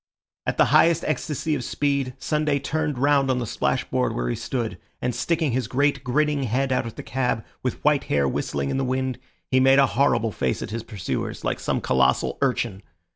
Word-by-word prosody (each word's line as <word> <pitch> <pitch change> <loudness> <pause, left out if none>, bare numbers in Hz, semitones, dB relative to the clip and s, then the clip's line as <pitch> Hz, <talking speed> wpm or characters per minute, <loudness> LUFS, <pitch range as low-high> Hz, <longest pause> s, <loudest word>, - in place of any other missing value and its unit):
At - - -1
the - - +6
highest 165 +2 +5
ecstacy 155 +1 -1
of 135 -4 -2
speed, 140 -1 -1
Sunday 150 +1 0
turned 150 0 -2
round 140 0 +3
on 130 - +2
the 125 - -1
splashboard - - -1
where - - -1
he - - -1
stood, 115 -8 -3 0.2
and 125 0 -1
sticking 155 +4 0
his 125 -2 -1
great 140 +2 +1
grinning 145 +3 +1
head 130 +2 0
out 125 - +1
of 115 - -8
the - - -7
cab, 125 -3 -1 0.2
with 125 - -3
white 150 -2 +3
hair 70 -1 +1
whistling 70 +1 -2
in - - -1
the 135 - 0
wind, 130 -1 -1 0.3
he 130 - +4
made 135 +1 +6
a 140 - +7
horrible 120 -4 +2
face 65 -9 -1
at - - -7
his 115 +1 -3
pursuers, 105 -5 -4
like - - -1
some - - -1
colossal 65 0 +2
urchin. 120 -7 0
130 Hz, 200 wpm, -24 LUFS, 115-145 Hz, 0.3 s, a